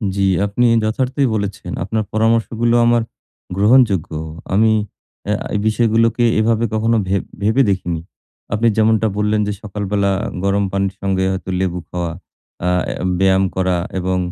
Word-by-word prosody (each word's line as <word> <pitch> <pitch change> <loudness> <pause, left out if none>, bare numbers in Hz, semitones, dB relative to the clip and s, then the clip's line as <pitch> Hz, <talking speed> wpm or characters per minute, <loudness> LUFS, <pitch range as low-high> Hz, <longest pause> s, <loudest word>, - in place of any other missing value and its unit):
জি, 100 - -1 0.2
আপনি 105 +5 +1 0.2
যথার্থই 130 +5 0
বলেছেন। 100 -1 -4
আপনার 110 +3 -1
পরামর্শগুলো 115 +1 +1
আমার 120 0 +3 0.6
গ্রহণযোগ্য। 105 -6 +3 0.4
আমি 110 +3 +4 0.6
আ - - +2 0.2
এই - - +1
বিষয়গুলোকে 115 +1 +2 0.2
এভাবে 115 +1 +2
কখনো 115 +1 +2
ভেব 95 0 0 0.2
ভেবে 110 +6 +3
দেখিনি। 90 -4 -1 0.5
আপনি 110 +3 +2
যেমনটা 110 0 +3
বললেন 105 0 +1
যে 105 - -1
সকালবেলা 100 -1 -1 0.3
গরম 100 +1 +1
পানির 100 0 -1
সঙ্গে 95 -1 0
হয়তো 95 0 -5
লেবু 90 -2 -1
খাওয়া, 85 -2 -3 0.5
আ 90 - +2 0.2
অ্যা - - -3 0.2
ব্যায়াম 95 0 +3
করা 95 -1 +1 0.2
এবং 90 0 -1
105 Hz, 140 wpm, -18 LUFS, 95-115 Hz, 0.6 s, আমি